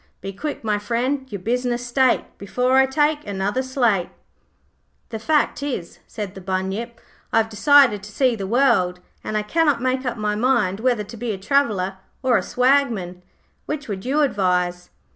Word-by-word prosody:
Be 195 +1 -6
quick, 290 +7 -5
my 210 -2 0
friend, 255 +5 -2
your 200 -3 -5
business 245 +3 -1
state, 255 +1 +2 0.2
Before 250 +6 +1
I 265 - +5
take 295 +1 +1
another 205 +5 -1
slate.' 240 -8 +1 1.0
'The 220 - -5
fact 295 +4 +1
is,' 255 -12 -5
said 205 -3 -6
the 190 - -10
Bunyip, 190 +6 -3 0.3
'I - - +2
have 225 0 +2
decided 255 -2 +5
to 210 +2 -11
see 255 +2 +2
the 195 -3 -5
world, 205 -7 +2 0.2
and 215 - -2
I 210 - -1
cannot 295 +2 +2
make 255 +1 0
up 245 -2 -3
my 210 -1 -1
mind 215 -4 +1
whether 240 -2 +1
to 215 +3 -11
be 235 -1 -3
a - - -5
Traveller 195 -4 0 0.3
or 255 -2 +3
a - - +3
Swagman. 245 -9 +1 0.5
Which 295 -1 -4
would 195 -3 -5
you 275 +5 +1
advise?' 180 -8 0
235 Hz, 175 wpm, -22 LUFS, 195-260 Hz, 1.0 s, I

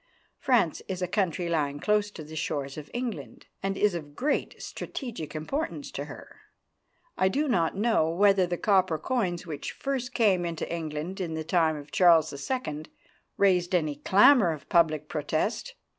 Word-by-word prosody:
France 230 - +2
is 185 -1 -3
a - - 0
country 180 -3 -1
lying 145 -4 -1
close 210 +3 +1
to 170 -6 -9
the 155 +1 -10
shores 140 -3 -3
of 150 -1 -8
England, 240 -3 -5 0.2
and 195 0 -2
is 210 -2 +3
of 150 -4 -7
great 295 +4 -1
strategic 225 - -6
importance 280 - -3
to - - -5
her. - - -12 0.8
I 190 - +4
do 290 +9 0
not 175 - +1
know 210 -7 +2
whether 195 +1 +4
the 175 0 -2
copper 185 -5 +2
coins 180 - -1
which 150 -4 -5
first 265 -3 -4
came 200 -6 +3
into 170 -2 -3
England 165 +3 -4
in 165 -3 -3
the 160 - -3
time 160 -1 +2
of 145 0 -10
Charles 165 +1 +5
II. 155 - -4 0.5
raised 180 -2 +3
any 155 -4 0
clamour 200 - +5
of 155 -3 -8
public 155 -3 +3
protest. 160 - -2
175 Hz, 165 wpm, -27 LUFS, 155-210 Hz, 0.8 s, Charles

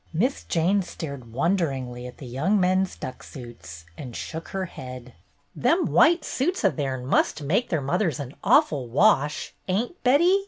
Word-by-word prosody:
Miss 245 - 0
Jane 180 +5 +2
stared 140 -9 -7
wonderingly 135 - -1
at 125 - -11
the 140 - -9
young 150 - +1
men's 185 +1 +2
duck 130 - -7
suits, 85 - -10
and 125 -5 -8
shook 165 +1 -6
her 190 -1 -3
head. 125 -6 -9 0.4
"Them 340 +1 +2
white 335 0 +4
suits 335 - -1
o' 195 - +5
theirn 130 -4 -3
must 145 +2 +1
make 195 - +1
their 160 -4 0
mothers 165 +2 0
an 140 -1 -6
awful 135 -5 +3
wash, 150 - +2
ain't, 230 - -2
Betty? 340 +10 +5
160 Hz, 160 wpm, -25 LUFS, 130-195 Hz, 0.4 s, o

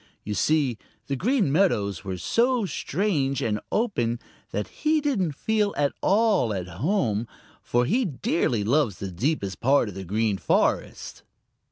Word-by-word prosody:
You 105 - -3
see, 135 +1 +1 0.3
the 140 - -2
Green 210 - +1
Meadows 105 - +1
were 95 -2 -4
so 235 - +1
strange 150 -5 -1
and 105 -2 0
open 120 - 0 0.3
that 105 - -3
he 310 +1 0
didn't 225 - 0
feel 210 +6 0
at 145 -1 +1
all 200 - +3
at 90 -2 -4
home, 115 - -1 0.3
for 120 0 +1
he 245 - +2
dearly 130 - 0
loves 120 - +1
the 95 -1 -5
deepest 100 - -2
part 135 -3 +3
of - - -8
the 95 +1 -6
Green 105 +1 0
Forest. - - 0
135 Hz, 150 wpm, -25 LUFS, -, 0.3 s, all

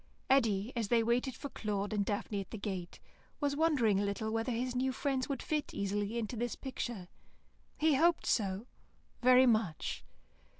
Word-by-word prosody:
Eddy, 230 -4 +3
as 230 -3 -1
they 230 +1 +3
waited 240 +3 +1
for 285 - -6
Claude 205 -3 -3
and 205 -1 +1
Daphne 205 0 -2
at 195 - -10
the 220 - -6
gate, 190 -4 -5 0.4
was 285 -1 0
wondering 280 -11 +3
a - - +1
little 200 +2 -2
whether 225 +3 -1
his 250 +2 -2
new 260 +1 +1
friends 265 0 -1
would 275 - -3
fit 305 -2 -2
easily 205 +3 -1
into 230 +1 -3
this 240 +1 -2
picture. 240 -8 -5 0.7
He 315 0 +3
hoped 330 +5 +3
so, 200 -1 0 0.6
very 255 +1 +7
much. 215 -9 0
230 Hz, 170 wpm, -33 LUFS, 205-260 Hz, 0.7 s, very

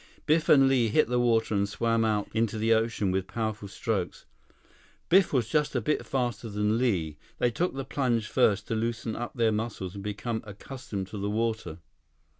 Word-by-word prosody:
Biff 155 +1 +2
and 135 -2 +7
Li 130 -3 +3
hit 120 +5 +2
the 125 0 +1
water 115 -2 +2
and 100 0 +1
swam 115 +1 +1
out 105 -2 0
into 110 -1 0
the 110 +1 +3
ocean 110 -3 +1
with 95 0 -1
powerful 110 -3 -3
strokes. - - -3 0.8
Biff 190 0 +5
was 125 -6 +1
just 150 +3 0
a - - +3
bit 150 +7 0
faster 120 -3 -2
than 105 +2 0
Li. 85 - 0 0.2
They 120 - +2
took 175 +5 -1
the 135 -1 -4
plunge 125 -6 0
first 105 -5 +2
to - - 0
loosen 115 0 -2
up 120 0 -5
their 115 -2 +2
muscles 105 -4 -3
and 100 -1 -8
became 110 +2 -3
accustomed 105 -1 -7
to 105 - -6
the 100 +1 -2
water. 110 -6 -2
115 Hz, 190 wpm, -28 LUFS, 105-120 Hz, 0.8 s, and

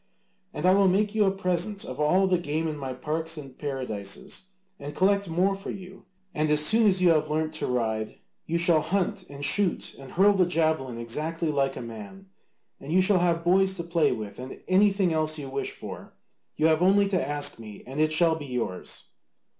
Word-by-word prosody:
And 150 - -4
I 185 - +6
will 195 0 +4
make 205 +3 +1
you 215 -1 +3
a 195 - +3
present 195 +1 -2
of 130 - -7
all 180 +6 +3
the 185 -2 +2
game 160 0 -2
in 155 - -3
my 135 -3 -5
parks 160 +5 -3
and 135 -3 -9
paradises, 130 - -5 0.3
and 145 +1 -7
collect 200 +1 +2
more 180 +4 +1
for 195 +1 -7
you, 190 -1 -9 0.3
and 155 -1 0
as 150 0 +4
soon 220 +4 +5
as 185 -2 +2
you 175 - +6
have 155 -2 +2
learnt 155 +1 -1
to - - -3
ride 110 -3 -2 0.3
you 170 - 0
shall 170 -2 +4
hunt 185 +4 -1
and 140 0 -5
shoot 190 +5 +2
and 135 -1 -11
hurl 200 +4 +5
the 185 -3 +2
javelin 160 -7 0
exactly 155 +8 -3
like 135 -2 0
a - - -5
man. 115 - -10 0.5
And 140 - -8
you 180 - +4
shall 190 -1 +4
have 170 -1 +1
boys 190 +2 +3
to 170 - -4
play 170 -1 +1
with 110 -3 -6
and 130 +1 -9
anything 195 -2 +3
else 155 0 0
you 145 -2 -6
wish 135 +1 -3
for: - - -10 0.4
you 155 - 0
have 160 0 +3
only 200 +2 +4
to 180 -8 -1
ask 145 -4 +1
me 105 -2 -11
and 135 +4 -6
it 155 0 +2
shall 165 +1 +3
be 155 -3 -6
yours." 120 -8 -5
160 Hz, 210 wpm, -26 LUFS, 140-185 Hz, 0.5 s, I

